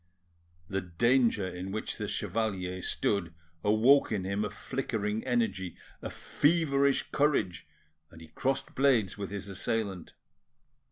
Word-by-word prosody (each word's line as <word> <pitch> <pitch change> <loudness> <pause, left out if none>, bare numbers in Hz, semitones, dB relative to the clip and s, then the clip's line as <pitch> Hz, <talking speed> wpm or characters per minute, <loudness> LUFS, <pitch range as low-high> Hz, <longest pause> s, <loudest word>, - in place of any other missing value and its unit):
The 95 +1 -1
danger 115 +3 +2
in 90 +1 -5
which 110 +2 -4
the - - -2
chevalier 95 -5 -2
stood 85 -3 -1 0.3
awoke 115 +7 +5
in 100 -4 0
him 100 +2 -1
a 105 - -1
flickering 110 -1 -3
energy, 110 -8 -1 0.2
a - - -4
feverish 140 -3 +2
courage, 140 - +1 0.4
and 80 - -14
he 80 -1 -12
crossed 135 +9 -2
blades 120 -8 +2
with 100 - -3
his 100 -1 -6
assailant. 100 -2 -3
105 Hz, 125 wpm, -30 LUFS, 95-125 Hz, 0.4 s, awoke